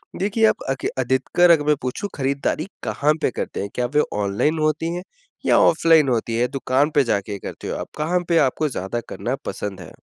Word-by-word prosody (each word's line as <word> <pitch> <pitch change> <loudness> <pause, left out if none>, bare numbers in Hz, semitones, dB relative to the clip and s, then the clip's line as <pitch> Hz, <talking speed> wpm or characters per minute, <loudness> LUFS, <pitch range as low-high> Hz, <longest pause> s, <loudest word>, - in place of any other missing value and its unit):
देखिए 210 +3 +1
आप - - 0
अक 135 -1 -2
अधिकतर 130 +7 +2
अगर 155 -3 +4
मैं 150 0 +4
पूछूँ 130 - -3
खरीदारी 140 +4 -1 0.2
कहाँ 130 +7 +1
पे 130 - +1
करते - - -4
हैं? 100 - -4
क्या 125 - 0
वे 150 - +6 0.2
ऑनलाइन 105 +11 0
होती 155 +2 0
हैं 180 - -5 0.4
या - - +4
ऑफलाइन 160 -3 +5
होती 115 -1 0
हैं? 125 +1 +1
दुकान 135 +1 +1
पे 145 - +5
जा 115 - +1
के 100 0 -6
करते - - -7
हो - - -3
आप? - - -5
कहाँ 165 +4 +1
पे 170 - +4
आपको 155 +4 -1
ज़्यादा 120 -1 -3
करना - - -3
पसंद 100 -2 -5
है? 85 - -11
140 Hz, 210 wpm, -22 LUFS, 120-160 Hz, 0.4 s, वे